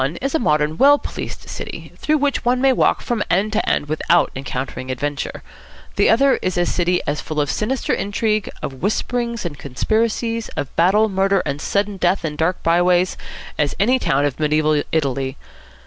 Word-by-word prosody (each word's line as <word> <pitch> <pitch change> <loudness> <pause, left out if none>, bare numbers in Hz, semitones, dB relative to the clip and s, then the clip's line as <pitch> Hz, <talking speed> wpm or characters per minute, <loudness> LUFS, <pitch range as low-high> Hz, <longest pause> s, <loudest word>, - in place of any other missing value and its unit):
One 135 +5 -1
is 275 +7 -3
a 320 - +2
modern, 150 -5 +1
well 285 +1 +7
policed - - -7
city, - - -7
through 305 0 +1
which 285 -1 0
one 245 +1 +2
may 265 0 +4
walk - - +2
from 235 -3 -1
end 205 +4 +1
to 220 - 0
end 145 - 0
without 155 +3 +2
encountering 130 -1 -5
adventure. 140 +2 -3 0.5
The - - +3
other 270 +4 +4
is 185 -1 -1
a 175 - +2
city 180 0 +1
as 150 +1 -2
full 155 -1 -4
of 145 -3 +1
sinister 245 - -1
intrigue, 210 +1 -1
of 130 -1 -6
whisperings 235 +2 -1
and 150 -4 -5
conspiracies, 225 - -1
of 140 - -4
battle, 195 +6 +4
murder, 195 -1 +1
and 140 +1 -3
sudden 200 0 -1
death 180 0 +1
in 150 -2 -3
dark 165 +4 -1
by 170 +1 +3
ways, 180 +1 +2 0.4
as 145 -1 +1
any 250 +6 +3
town 140 - +1
of 145 -1 -2
mediaeval 155 0 +2
Italy. 135 -3 -1
180 Hz, 185 wpm, -20 LUFS, 150-220 Hz, 0.5 s, well